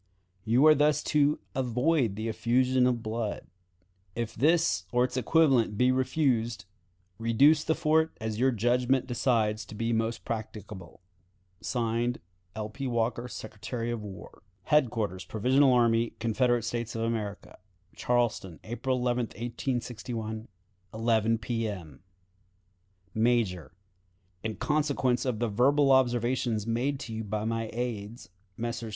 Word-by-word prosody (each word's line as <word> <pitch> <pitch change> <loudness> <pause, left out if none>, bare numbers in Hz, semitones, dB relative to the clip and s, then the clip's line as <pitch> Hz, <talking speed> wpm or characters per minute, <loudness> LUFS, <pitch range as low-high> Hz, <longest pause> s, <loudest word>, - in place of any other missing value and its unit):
You 120 +6 +4
are 155 - +9
thus 150 0 +2
to 150 0 +4 0.2
avoid 125 -1 +1
the 110 +2 -4
effusion 125 +3 +2
of 120 -2 -1
blood. 110 -1 -3 0.7
If 115 -1 -3
this 155 - +2
or 125 0 +3
its 125 0 -2
equivalent 130 -5 +3
be 125 +2 +4
refused, 125 -5 0 0.5
reduce 135 +7 +4
the 160 - +1
fort 160 +1 +1
as 110 -1 -3
your 130 +2 +4
judgment 125 +2 +1
decides 115 -4 0
to 105 - -9
be 115 +2 -1
most 115 +1 -1
practicable. 105 -5 -7 0.6
(Signed) 120 +3 -1 0.4
"L. 110 -1 -3
P. 135 +5 -5
Walker, 120 0 -1
Secretary 115 +1 -5
of 120 -2 -3
War." 100 -3 -10 0.2
"Headquarters 115 - +1
Provisional 130 +8 +3
Army, 115 -2 +3
C. 115 -1 -1 0.5
S. 115 -1 -6
A., 115 -3 -2 0.6
"Charleston, 120 -8 -1
April 125 +3 -2
11, 125 -1 0
1861, 115 -2 -4 0.5
11 115 0 +2
P. 115 0 -2
M. 85 -9 -8 1.1
"Major: 110 -7 +1 0.7
In 110 -1 -3
consequence 145 -5 0
of 125 -4 -1
the 120 +2 0
verbal 135 +6 +3
observations 120 -3 +2
made 120 +5 0
by - - -7
you 110 0 -4
to 105 0 -3
my 115 0 -2
aides, 115 -2 -5 0.3
Messrs. 115 -1 -4
120 Hz, 125 wpm, -28 LUFS, 110-130 Hz, 1.1 s, are